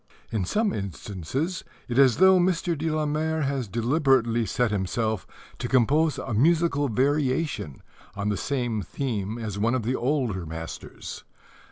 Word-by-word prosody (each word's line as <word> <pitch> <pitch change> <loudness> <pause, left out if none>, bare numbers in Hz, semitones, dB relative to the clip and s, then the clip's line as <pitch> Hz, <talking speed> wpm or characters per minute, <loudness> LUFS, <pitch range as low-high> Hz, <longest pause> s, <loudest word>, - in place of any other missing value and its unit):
In 105 -5 -1
some 215 - +1
instances 105 - -4 0.2
it 120 +1 0
is 135 -3 +7
as - - -12
though 190 0 +6
Mr. 175 -1 +1
de 160 +2 -2
la 155 0 0
Mare 155 +1 0
had 135 -6 -2
deliberately 120 -2 +2
set 120 -2 +1
himself 105 +1 -1 0.3
to 120 - -2
compose 140 +5 +3
a 130 - -4
musical 145 +3 +3
variation 135 - 0 0.3
on 100 +1 -1
the 105 - +1
same 120 -4 -1
theme 110 -2 -3
as 105 -3 -4
one 115 +4 +2
of 125 - -1
the 125 +4 0
older 125 - 0
masters. 80 +1 -7
130 Hz, 155 wpm, -26 LUFS, 110-150 Hz, 0.3 s, is